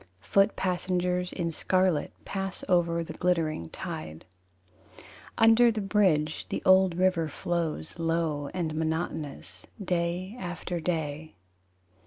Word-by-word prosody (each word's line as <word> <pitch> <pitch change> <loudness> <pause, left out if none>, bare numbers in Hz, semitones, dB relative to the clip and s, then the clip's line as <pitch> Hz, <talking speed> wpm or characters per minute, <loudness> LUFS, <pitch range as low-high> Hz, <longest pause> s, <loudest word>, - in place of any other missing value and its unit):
Foot 195 - +3
passengers 180 0 -1
in 170 -2 -2
scarlet 185 -1 +1
Pass 195 -1 -4
over 170 -2 +2
the - - -7
glittering 160 - 0
tide. 80 0 -7 1.1
Under 225 +1 +6
the 220 - -3
bridge 185 -7 +1
The - - -3
old 185 -2 +5
river 185 -3 +2
flows 165 - -3
Low 165 -3 0
and 170 -4 -2
monotonous 160 -2 -3
Day 180 +1 -2
after 175 -1 -4
day. 160 -2 -3
175 Hz, 110 wpm, -28 LUFS, 160-185 Hz, 1.1 s, Under